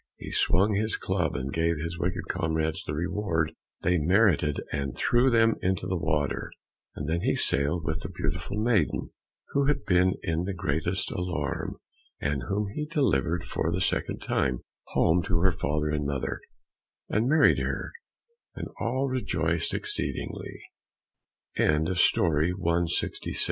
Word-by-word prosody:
He - - -8
swung 100 +4 +3
his 110 +2 +1
club 90 -5 -1
and 65 +2 -3
gave 85 0 +1
his 85 +3 -4
wicked 90 0 -2
comrades 80 0 -1
the 75 - -4
reward 85 -1 -1 0.3
they 90 0 +3
merited 85 -3 +3
and 70 -3 -3
threw 120 +2 +3
them 115 -2 +4
into 90 -1 0
the 95 0 -1
water, 75 -4 -1 0.4
and 75 - -4
then 85 +2 0
he - - +1
sailed 75 +5 +1
with 80 0 -2
the - - -5
beautiful 100 - -3
maiden, 110 -7 +1 0.4
who 140 0 +1
had 145 0 +1
been 90 -1 +3
in 85 +1 -1
the 95 0 -3
greatest 85 +4 -1
alarm, 85 -5 -3 0.4
and 70 -3 -1
whom 100 +1 -1
he 150 +4 -3
delivered 90 - +1
for - - -1
the - - -1
second - - -1
time, 65 -2 0 0.3
home 85 +2 +3
to 85 0 0
her 95 +1 +4
father 75 -4 -1
and 75 -1 -1
mother, 70 -2 -2 0.7
and 110 +4 +1
married 155 +2 +5
her, - - -2 0.6
and - - -5
all 130 +4 0
rejoice 90 -10 0
85 Hz, 140 wpm, -27 LUFS, 75-100 Hz, 0.7 s, married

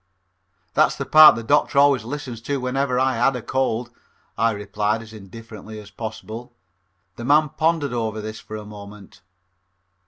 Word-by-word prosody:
"That's - - +3
the - - -5
part 155 0 +8
the 115 - -5
doctor 145 +3 +1
always 140 -4 +4
listened 125 -2 -7
to 140 - -1
whenever 125 0 -1
I 130 -2 +1
had 130 +3 +2
a 125 - -4
cold," 120 -2 -1 0.4
I 115 +1 +2
replied 105 +1 -2
as 110 0 -14
indifferently 110 +1 -11
as 105 -1 -13
possible. 115 +3 -8 0.6
The 120 - -7
man 150 +3 +4
pondered 160 -3 0
over 110 -2 -2
this 110 0 -7
for 110 - -9
a 105 -1 -7
moment. 105 -2 -12
115 Hz, 160 wpm, -22 LUFS, 110-135 Hz, 0.6 s, part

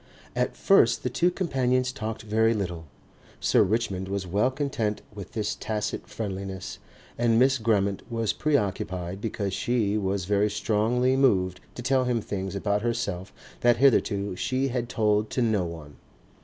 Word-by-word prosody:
At - - -1
first 195 - +4
the 125 - -1
two 170 +8 +3
companions 130 -8 0
talked 110 -4 -5
very 110 +1 +2
little. 90 -5 -3 0.5
Sir - - +3
Richmond 95 -3 0
was 100 -1 -3
well 100 +8 +2
content 130 -6 -2
with 100 -4 -9
this 110 -2 -1
tacit 105 -1 -3
friendliness 95 -3 -5 0.4
and 115 -1 +3
Miss 130 +2 +4
Grammont 100 -3 +1
was 115 -2 0
preoccupied 95 - -1
because 100 -3 -2
she 110 -2 0
was 95 -2 -1
very 105 +2 +2
strongly 115 +5 +1
moved 95 -9 +2 0.2
to 120 - -6
tell 130 0 +2
him 125 -2 +1
things 95 -2 -4
about 100 +1 0
herself 115 -5 -2 0.3
that 120 0 +4
hitherto 100 -7 +2
she 130 +7 0
had 120 -1 -2
told 105 -1 +1
to 125 - -1
no 105 -5 +1
one. 80 -4 -9
110 Hz, 155 wpm, -26 LUFS, 100-125 Hz, 0.5 s, first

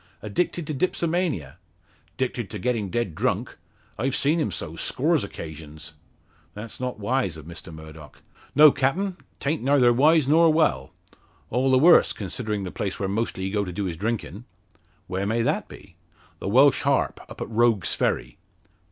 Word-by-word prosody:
"Addicted 160 - -1
to 155 - -4
dipsomania?" 160 - -1 0.6
"'Dicted 125 -5 -2
to 105 - -6
getting 110 -1 -1
dead 110 -3 -2
drunk. - - -2 0.4
I've 130 +3 0
seen 155 +4 +1
him 150 - 0
so, - - -6
scores - - +1
o' - - -4
'casions." 80 -1 -9 0.6
"That's 105 +1 -8
not 125 -2 -3
wise 105 - -1
of 75 - -11
Mr 85 0 -10
Murdock." 80 -1 -12 0.3
"No, 150 0 +9
captain; 175 +9 -1 0.2
'ta'nt 150 +3 -1
neyther 130 -2 +4
wise 150 +3 +4
nor 165 +2 +5
well. 70 - +1 0.6
All 130 +3 +1
the 130 - +5
worse, 170 +6 +6
considerin' 105 +1 -4
the 90 - -5
place 100 -2 -4
where 95 - -1
mostly 100 -2 -2
he 95 - -2
go 105 0 0
to 90 - -5
do 100 +3 -3
his 85 -3 -3
drinkin'." 110 +2 -4 0.6
"Where 95 +2 -3
may 115 +2 +1
that - - -1
be?" - - -15 0.4
"The - - -4
Welsh 135 +5 +5
Harp - - +1
up - - -11
at - - -5
Rogue's 115 -4 +2
Ferry." - - -1
115 Hz, 170 wpm, -24 LUFS, 95-140 Hz, 0.6 s, No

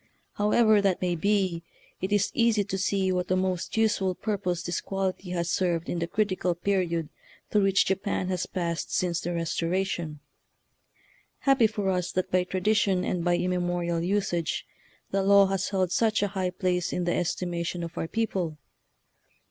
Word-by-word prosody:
However 210 0 +4
that 195 -3 +1
may 180 -1 0
be, 190 -1 +1 0.4
it 190 - -2
is 205 0 +2
easy 230 -6 +3
to 195 -1 -3
see 195 -1 +1
what 180 0 -1
a 185 - +3
most 185 +1 -1
useful 200 -4 +2
pur 210 0 -2
pose 180 -2 -2
this 175 - -2
quality 195 -1 -3
has 170 -1 -1
served 175 -3 0
in 175 - -1
the 170 - -1
critical 185 -2 0
period 170 -4 0 0.4
through 210 - +4
which 195 -1 +3
Japan 190 -1 -1
has 185 -1 -1
passed 170 -2 -3
since 175 -1 0
the 175 - -3
Restoration. 170 -1 -2 1.2
Happy 270 -5 +4
for 205 -3 -1
us 180 -1 -1
that 185 - -1
by 180 0 +2
tradition 190 0 +1
and 175 -2 -1
by 175 0 +3
immemorial 175 -2 -1
usage 175 -3 -1 0.5
the 195 - +1
law 200 +1 +6
has 195 0 -1
held 185 -3 0
such 220 0 +2
a 205 - 0
high 190 -2 -1
place 180 -1 -1
in 180 - -1
the 175 - +1
estimation 175 0 -2
of 170 0 -6
our - - -2
people! 185 -7 -2
185 Hz, 170 wpm, -27 LUFS, 175-200 Hz, 1.2 s, law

